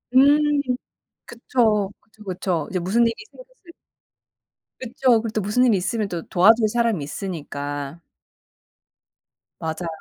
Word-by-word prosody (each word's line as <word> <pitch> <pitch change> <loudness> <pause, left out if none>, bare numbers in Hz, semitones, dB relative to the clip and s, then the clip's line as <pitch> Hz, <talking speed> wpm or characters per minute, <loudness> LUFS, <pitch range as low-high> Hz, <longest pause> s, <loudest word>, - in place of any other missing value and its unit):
음 290 +2 +5 0.6
그쵸. 220 -4 0
그쵸, 215 0 -20
그쵸. 180 -4 -2
이제 185 - -1
무슨 195 +7 +1
일이 230 - 0 0.2
생길 - - -14 0.2
수 345 - -25
있 - - -11 1.1
그쵸. 245 -2 +2
그리고 230 - -4
또 215 - 0
무슨 210 +6 +2
일이 220 -5 +4
있으면 205 +3 -2
또 175 -3 -4
도와줄 215 +5 +5
사람이 230 -9 0
있으니까. 145 -3 -5 1.6
맞아요. 160 +2 -4
210 Hz, 265 characters per minute, -22 LUFS, 175-235 Hz, 1.6 s, 음